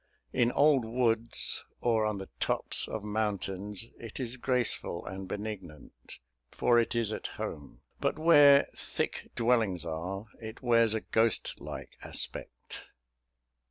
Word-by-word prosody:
In 120 -1 +3
old 145 -3 +4
woods, 115 -1 0 0.2
or 110 -2 +2
on 105 -1 -2
the 95 0 -7
tops - - +3
of 110 - -5
mountains, 105 -1 -2
it 115 +1 -8
is 125 -1 -2
graceful 125 -8 -1
and 95 0 -6
benignant, 100 -7 -8 0.3
for 120 -1 +3
it 115 - 0
is 115 -2 +1
at - - -4
home; 70 -2 -6 0.2
but - - 0
where 145 -3 +7
thick - - -3
dwellings 115 -8 +1
are, 90 +5 -4 0.2
it 110 +2 -9
wears 115 -2 +4
a 110 - -1
ghost 110 -1 +1
like - - -8
aspect. - - -5
110 Hz, 130 wpm, -30 LUFS, 100-120 Hz, 0.3 s, where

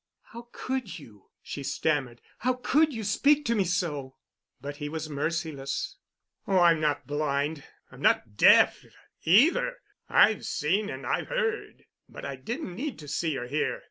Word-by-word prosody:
"How 235 +1 -9
could 260 -6 -4
you?" 110 - -16
she 145 - -6
stammered. 135 -4 -1 0.2
"How 255 +3 +1
could 285 +5 +2
you 225 -4 -5
speak 285 +8 +3
to 235 - +2
me 205 -4 +1
so?" 150 -7 -2 0.4
But 145 +2 -7
he 145 -1 -5
was 155 0 -5
merciless. 145 -2 -3 0.5
"Oh, 195 - +2
I'm 170 -3 +5
not 150 -2 0
blind, 145 +1 -1
and 140 - -15 0.3
I'm - - -13
not 105 -2 +2
deaf, - - +6 0.4
either. 310 - +4 0.3
I've 220 - +4
seen 195 +7 0
and - - -6
I've - - -1
heard. 470 -4 -2 0.3
But - - -9
I 140 - -4
didn't 215 - -5
need 260 +7 -4
to 150 - -11
see 155 0 -1
or 120 - -4
to 125 - -9
hear. 150 +3 -1
165 Hz, 170 wpm, -27 LUFS, 145-235 Hz, 0.5 s, deaf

